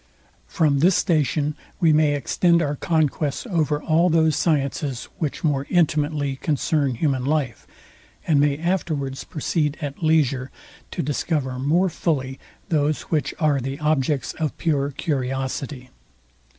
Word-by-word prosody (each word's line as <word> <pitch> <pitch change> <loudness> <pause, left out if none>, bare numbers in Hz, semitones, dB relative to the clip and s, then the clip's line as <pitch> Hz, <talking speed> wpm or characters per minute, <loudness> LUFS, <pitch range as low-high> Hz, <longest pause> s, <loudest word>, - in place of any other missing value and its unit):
From 150 -4 +2
this 175 +5 +4
station 150 -3 +1 0.3
we 165 -4 +4
may 150 -1 +3
extend 170 +5 +2
our 145 -1 -1
conquests 150 - 0
over 155 - 0
all 165 +2 +3
those 160 -1 +3
sciences, 140 -5 0 0.2
which 150 -3 -3
more 140 -3 0
intimately 150 -5 +1
concern 145 -2 0
human 135 0 0
life, 140 -6 -1 0.6
and 150 -3 +3
may 145 -1 +2
afterwards 155 -6 -2
proceed 150 -2 -1
at 145 0 -6
leisure 140 -5 +2 0.4
to - - -3
discover 140 -2 -1
more 165 +8 +2
fully 140 -6 -2 0.3
those, 150 -2 +1
which 150 -4 0
are 150 -4 +2
the 135 +2 -4
objects 150 -2 0
of 155 -3 -2
pore 145 -4 0
curiosity. 135 -1 -3
150 Hz, 130 wpm, -23 LUFS, 135-160 Hz, 0.6 s, this